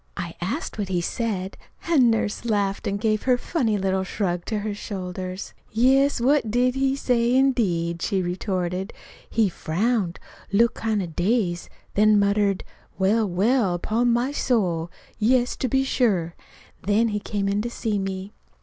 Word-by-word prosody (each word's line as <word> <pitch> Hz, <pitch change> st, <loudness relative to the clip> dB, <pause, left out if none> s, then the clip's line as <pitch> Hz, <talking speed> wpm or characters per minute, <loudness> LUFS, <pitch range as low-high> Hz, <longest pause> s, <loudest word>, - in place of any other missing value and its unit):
I 170 Hz, -2 st, -4 dB
asked 220 Hz, -, -3 dB
what 200 Hz, -, -1 dB
he 180 Hz, -2 st, +1 dB
said, 195 Hz, 0 st, -3 dB, 0.3 s
and 280 Hz, -8 st, +5 dB
Nurse 220 Hz, -2 st, -1 dB
laughed 205 Hz, -4 st, 0 dB
and 200 Hz, 0 st, -1 dB
gave 215 Hz, -1 st, +1 dB
her 250 Hz, -1 st, +3 dB
funny 240 Hz, -6 st, 0 dB
little 190 Hz, -1 st, 0 dB
shrug 180 Hz, -3 st, -2 dB
to 220 Hz, -, -2 dB
her 210 Hz, 0 st, -3 dB
shoulders. 185 Hz, -2 st, -6 dB, 0.2 s
"Yes, 265 Hz, +5 st, +3 dB
what 265 Hz, -1 st, +2 dB
did 245 Hz, +3 st, +2 dB
he 270 Hz, 0 st, +1 dB
say, 245 Hz, -2 st, +1 dB
indeed?" 180 Hz, -11 st, +1 dB
she 195 Hz, -3 st, 0 dB
retorted. 180 Hz, +1 st, -2 dB, 0.4 s
"He 225 Hz, -2 st, +2 dB
frowned, 190 Hz, +2 st, -1 dB, 0.3 s
looked 230 Hz, +4 st, +4 dB
kind 220 Hz, -3 st, -1 dB
of 165 Hz, -3 st, -8 dB
dazed, 180 Hz, -2 st, 0 dB, 0.2 s
then 215 Hz, 0 st, +5 dB
muttered: 200 Hz, -1 st, +2 dB, 0.3 s
'Well, 205 Hz, +2 st, +2 dB
well, 200 Hz, +1 st, +2 dB
upon 230 Hz, +7 st, +1 dB
my 240 Hz, +3 st, +1 dB
soul! 185 Hz, -, 0 dB, 0.3 s
Yes, 245 Hz, +3 st, +2 dB
to 260 Hz, -, -1 dB
be 265 Hz, +2 st, +2 dB
sure!'" 200 Hz, -11 st, +1 dB, 0.5 s
Then 215 Hz, +3 st, +2 dB
he 210 Hz, -1 st, -1 dB
came 205 Hz, -1 st, -2 dB
in 200 Hz, +1 st, +1 dB
to 235 Hz, -, -3 dB
see 220 Hz, -3 st, -2 dB
me. 195 Hz, +1 st, -4 dB
210 Hz, 160 wpm, -24 LUFS, 190-240 Hz, 0.5 s, and